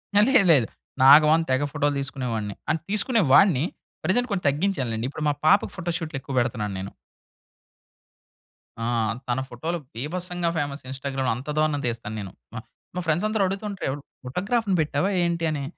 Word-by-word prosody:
హా! 205 - +7
లేదు 245 -8 +5
లేదు. 125 -7 +3 0.3
నాగవాన్ 150 +4 +7
తెగ 130 +2 +2
ఫోటోలు 145 0 0
తీసుకునే 135 -2 -4
వాడిని. 105 -2 -3
అండ్ 160 0 +1
తీసుకునే 220 +2 +2
వాడిని 150 -2 +6 0.4
ప్రజెంట్ 215 +9 +1
కొంచం 195 -3 -2
తగ్గించానులేండి. 135 - -1
ఇప్పుడు 150 +2 -5
మా - - +2
పాపకి 200 +6 +4
ఫోటో 175 -2 -3
షూట్‌లెక్కువ 140 -4 -6
పెడుతున్నాను 115 -4 -1
నేను. 95 +1 -6 1.9
ఆ! - - -1 0.4
తన 120 +1 0
ఫోటోలు 160 +8 -3 0.2
బీభత్సంగా 175 +6 -2
ఫేమస్ 145 -1 -3
ఇన్‌స్టాగ్రామ్‌లో 135 -1 -2
అంత 130 +5 -8
దారుణం‌గా 155 -3 +1
తీస్తాను 115 -2 -4
నేను. 100 -3 -6 0.2
మా - - -4 0.4
మా 180 - -1
ఫ్రెండ్స్ 160 +5 +1
అందరూ 215 -2 +1
అడుగుతుంటారు 195 +1 -4
ఎవరు 140 +2 -4 0.2
ఫోటోగ్రాఫ్‌ని 200 - 0
పెట్టావా 150 +4 0
ఏంటి? 170 -1 -1
అని. 145 -2 -3
150 Hz, 155 wpm, -25 LUFS, 130-180 Hz, 1.9 s, హా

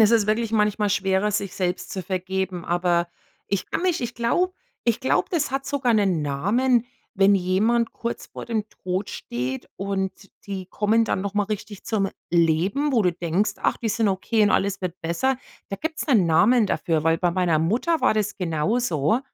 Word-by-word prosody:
es 220 0 +6
ist 225 -3 +4
wirklich 220 +1 0
manchmal 210 -1 +2
schwerer, 195 +1 +1
sich 200 -2 -2
selbst 180 -1 -2
zu 190 - -4
vergeben, 185 0 -3
aber 175 0 +1 0.4
ich 200 -2 -2
kann - - -1
mich 365 -3 +1
ich 240 - -4
glaube 355 +11 +1 0.4
ich 230 - +1
glaube, 265 - +1
das 315 -6 0
hat 270 +1 -2
sogar 265 -4 +1
'nen 190 -7 +2
Namen, 220 - +1 0.3
wenn 195 +1 +5
jemand 205 +6 +1
kurz 235 0 -5
vor - - -8
dem 220 -3 -1
Tod 185 +2 -4
steht 125 +2 -4
und 195 -1 -2 0.3
die 190 -2 -5
kommen 220 +4 +2
dann 190 - -1
nochmal 200 0 -1
richtig 210 -1 -5
zum 210 -4 0 0.2
Leben, 175 - +2
wo 230 - +3
du 180 -2 +2
denkst: 175 +5 0
„Ach, - - +2
die 230 - -2
sind 220 0 +1
okay 205 +3 +1
und 205 - +4
alles 200 -1 +1
wird 180 -1 -4
besser. 205 +11 0 0.3
Da 195 - -2
gibt's 320 +5 -4
'nen 220 - +4
Namen 210 +8 +4
dafür, 160 -4 0
weil 165 0 +3
bei 175 -1 +2
meiner 175 -3 +2
Mutter 235 - +1
war - - +4
das 210 -1 -1
genauso. 175 - 0
200 Hz, 185 wpm, -24 LUFS, 180-230 Hz, 0.4 s, es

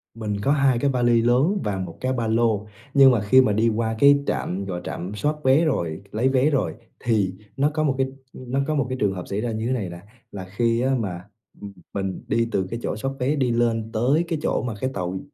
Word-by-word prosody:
Mình 105 -2 -3
có 140 - +1
2 135 -4 +3
cái 140 - +1
vali 120 -2 +3
lớn 135 - +2
và 100 -2 -2
1 90 -3 -6
cái 130 0 0
ba 115 -3 -1
lô. 110 -2 +1 0.3
Nhưng 135 -2 +7
mà 115 -5 +1
khi 130 +6 +6
mà 105 -5 +2
đi 115 +2 +2
qua 110 0 -1
cái 140 0 +6
trạm, 95 +2 -2
gọi 90 -2 -4
là - - -13
trạm 90 +4 -5
soát 150 +9 0
vé 135 +5 +4
rồi, 85 - -1
lấy 120 +5 +1
vé 135 +3 +3
rồi, 140 -3 0 0.2
thì 105 -6 +1 0.2
nó 140 +2 +3
có 155 -1 0
một 135 -3 +1
cái 135 0 +1 0.3
nó 130 +2 -3
có 155 - 0
một 140 -2 +1
cái 130 - -3
trường 100 -2 +2
hợp 90 - -6
xảy 100 +2 -2
ra 120 0 -2
như 110 +1 -3
thế - - -1
này 100 -8 -2
nè. 85 0 -9 0.3
Là 95 -2 -7
khi 115 +5 0
á, 130 +1 +2
mà 90 -2 -5 0.2
m - - -12 0.3
mình 95 -2 -3
đi 115 0 +1
từ 95 -1 0
cái 115 +3 -4
chỗ - - -2
soát 135 +5 -3
vé 130 +4 +1
đi 130 -4 +1
lên 115 -1 0
tới 130 +9 +2
cái 165 -3 -2
chỗ - - 0
mà 120 -3 -3
cái 130 - 0
tàu 90 -1 -3
115 Hz, 255 wpm, -23 LUFS, 100-130 Hz, 0.3 s, Nhưng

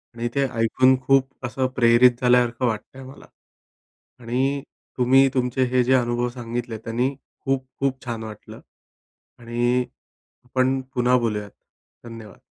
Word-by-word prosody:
आणि 120 0 -2
ते 140 0 +2
ऐकून 130 +3 +4
खूप 135 -1 +1
असं 130 +1 -1
प्रेरित 120 +1 +5
झाल्यासारखं 125 0 +3
वाटतं 115 +4 -5
आहे 130 - -10
मला 135 - -13 0.9
आणि 130 +4 -1 0.4
तुम्ही 130 +2 +5
तुमचे 130 0 0
हे 125 -1 +3
जे 130 - +2
अनुभव 120 -1 +1
सांगितले, 120 -1 -5
त्यानी 120 +5 -2 0.3
खूप-खूप 135 0 -2
छान 115 -2 -4
वाटलं 110 -1 -10 0.8
आणि 120 +1 0 0.6
आपण 130 +1 +1 0.2
पुन्हा 125 +1 +3
बोलूयात, 105 -4 -2 0.5
धन्यवाद. 115 -3 -11
125 Hz, 125 wpm, -23 LUFS, 120-130 Hz, 0.9 s, प्रेरित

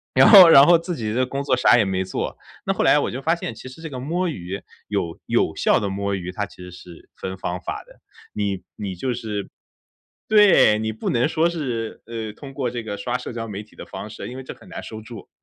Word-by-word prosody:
然 - - +7
后 190 -6 +11
然 140 -3 +9
后 175 +1 +7
自 170 +1 -4
己 110 -5 -3
的 130 +2 +1
工 135 +2 -4
作 135 -2 +2
啥 125 -1 +5
也 110 - +3
没 95 -1 -1
做。 95 - -4 0.3
那 - - +1
后 - - -1
来 - - +5
我 - - -1
就 130 - -5
发 165 +4 +2
现 145 - -5
其 110 - -11
实 130 +5 -13
这 160 - -6
个 130 -3 -6
摸 175 +7 -1
鱼， 95 - -6 0.3
有 85 -1 -3
有 - - +1
效 - - +3
的 100 - -2
摸 100 +1 -2
鱼， 90 -1 -5
它 105 +2 -3
其 - - -18
实 90 0 -10
是 90 -1 -14
分 95 0 -6
方 90 0 -4
法 - - -5
的。 - - -20 0.3
你 100 -3 -2
你 100 -3 -5
就 125 +8 -2
是 110 -4 -5 0.8
对， 205 - +6
你 110 0 -2
不 110 - -4
能 120 +2 +2
说 165 +1 +1
是， 125 -9 -4
呃， 110 -1 -6
通 135 +4 -11
过 135 -2 -2
这 120 -1 -5
个 105 -2 -5
刷 120 +4 -2
社 - - -7
交 115 -1 -5
媒 105 -1 -6
体 105 - -23
的 - - -9
方 - - -8
式， - - -8
因 125 - -8
为 130 - -7
这 - - -8
很 - - -18
难 - - -7
收 110 -1 -8
住。 110 -1 -11
115 Hz, 270 characters per minute, -22 LUFS, 100-135 Hz, 0.8 s, 后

